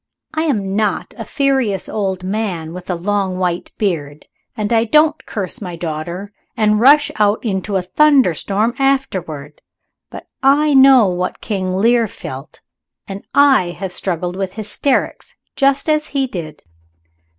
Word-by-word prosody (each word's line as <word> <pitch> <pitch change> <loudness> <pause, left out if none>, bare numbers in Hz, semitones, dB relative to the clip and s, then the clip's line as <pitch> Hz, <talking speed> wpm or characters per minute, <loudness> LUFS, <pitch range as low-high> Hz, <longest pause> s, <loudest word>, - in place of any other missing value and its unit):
I 315 +1 -1
am 200 -10 -1
not 215 -1 -1
a - - -6
furious 265 - 0
old 190 -3 -3
man 185 -5 -3
with 180 +1 -9
a 180 - 0
long 190 +1 -1
white 180 -2 -2
beard, 155 -8 -3 0.3
and 215 +1 -1
I 225 -1 +4
don't 300 +6 +2
curse 200 +3 -5
my 180 -3 -6
daughter 170 +4 -5 0.2
and 210 -1 +2
rush 285 +4 +5
out 210 +2 +1
into 195 -1 -2
a 185 - 0
thunderstorm 225 - +2
afterward 185 - -2 0.5
but - - -10 0.2
I 285 +2 +3
know 265 -3 +7
what 180 0 -3
King 190 -4 -3
Lear 230 +3 +3
felt, 135 -6 -9 0.5
and 195 0 -7
I 265 -12 +4
have 185 0 -5
struggled 180 -1 -3
with 190 -1 -4
hysterics 220 +6 -2 0.2
just 275 +1 +1
as 305 0 +1
he 275 -2 -1
did. 170 -10 -7
205 Hz, 145 wpm, -17 LUFS, 180-265 Hz, 0.5 s, know